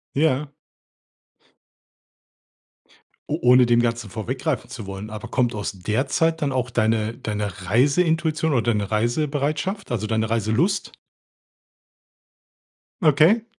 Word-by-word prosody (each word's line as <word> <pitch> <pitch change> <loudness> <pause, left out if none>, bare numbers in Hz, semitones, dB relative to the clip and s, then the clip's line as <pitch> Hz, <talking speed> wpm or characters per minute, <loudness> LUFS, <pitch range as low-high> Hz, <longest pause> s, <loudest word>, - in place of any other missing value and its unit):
Ja. 145 -1 +2 2.8
O - - -1
Ohne 125 0 +6
dem 120 0 +3
Ganzen 115 -4 -2
vorweggreifen 130 +6 -3
zu 110 -5 -7
wollen, 100 +2 -7
aber 110 0 -7
kommt 120 -3 0
aus 105 - -3
der 105 +7 -1
Zeit 165 +1 +1
dann 140 - 0
auch 125 -1 -1
deine 110 -1 0
deine 105 -3 -4
Reiseintuition 160 - +2
oder 120 - +3
deine 105 -3 -1
Reisebereitschaft, 145 - -1
also, 110 -2 -1
deine 110 0 -1
Reiselust? 115 - 0 2.1
Okay. 160 +10 +4
120 Hz, 110 wpm, -23 LUFS, 110-150 Hz, 2.8 s, Ohne